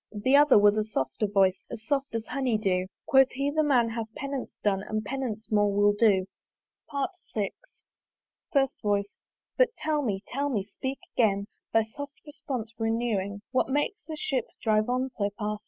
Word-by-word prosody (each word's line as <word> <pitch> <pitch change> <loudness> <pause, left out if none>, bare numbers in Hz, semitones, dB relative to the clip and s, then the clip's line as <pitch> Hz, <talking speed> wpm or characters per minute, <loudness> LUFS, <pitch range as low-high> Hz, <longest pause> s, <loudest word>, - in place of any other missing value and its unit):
The 220 +6 +2
other 290 -3 +7
was 205 0 +5
a 215 - +2
softer 205 -2 -2
voice, 195 -2 +2
As 225 -1 -8
soft 280 -3 -1
as 225 -1 -2
honey 260 -5 0
dew: 185 -3 0 0.2
Quoth 270 -1 +5
he 275 +3 0
the 310 +1 +2
man 255 -6 +3
hath 225 -1 -4
penance 275 -2 -4
done, 195 -2 +2
And 215 +1 -3
penance 230 -4 -4
more 205 -1 +3
will 205 +1 +4
do. 205 -3 +3 1.1
VI. 205 -3 0 1.0
FIRST 270 -2 +3
VOICE. 200 -1 0 0.4
"But - - +4
tell 305 -1 0
me, 205 -7 -2
tell 285 +2 -2
me! 215 -8 0
speak 265 +7 -5 0.2
again, 200 -4 +2 0.3
"Thy 225 - +4
soft 280 +6 -9
response 275 -7 -5
renewing 225 -3 -1
"What 255 0 +1
makes 295 +10 -1
that 315 -1 -5
ship 260 -5 -1
drive 215 0 +2
on 255 +1 0
so 205 -4 -1
fast? 210 -1 -2
225 Hz, 170 wpm, -28 LUFS, 205-270 Hz, 1.1 s, other